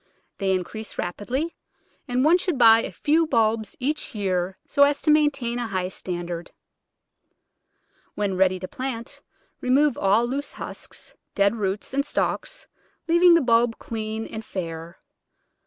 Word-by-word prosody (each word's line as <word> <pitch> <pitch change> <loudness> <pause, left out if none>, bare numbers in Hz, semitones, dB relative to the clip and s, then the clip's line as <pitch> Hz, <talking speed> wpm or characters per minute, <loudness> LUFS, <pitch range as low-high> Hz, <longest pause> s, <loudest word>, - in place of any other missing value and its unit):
They 195 -2 +1
increase 210 +4 -4
rapidly, 250 - -3 0.5
and 250 +1 +1
one 340 +4 +5
should 355 -5 -1
buy 225 -2 +7
a - - -5
few 320 +2 +2
bulbs 225 -5 +1
each 295 0 -2
year 185 -2 -1
so 285 - 0
as 285 0 +5
to 305 - +4
maintain 275 -6 +2
a 240 - -2
high 185 -3 -2
standard. 175 -2 -5 1.7
When 200 -2 -1
ready 185 0 +3
to 185 - -4
plant, 255 -1 -6 0.4
remove 270 +2 +2
all 205 +4 +3
loose 275 +4 -4
husks, - - -8 0.2
dead 200 +2 +3
roots, 200 +3 -3
and 280 +1 +1
stalks, - - -2 0.4
leaving 345 +1 +6
the 335 - +4
bulb 235 -2 +3
clean 220 0 -4
and 220 - -7
fair. 165 -3 -6
230 Hz, 140 wpm, -24 LUFS, 195-280 Hz, 1.7 s, buy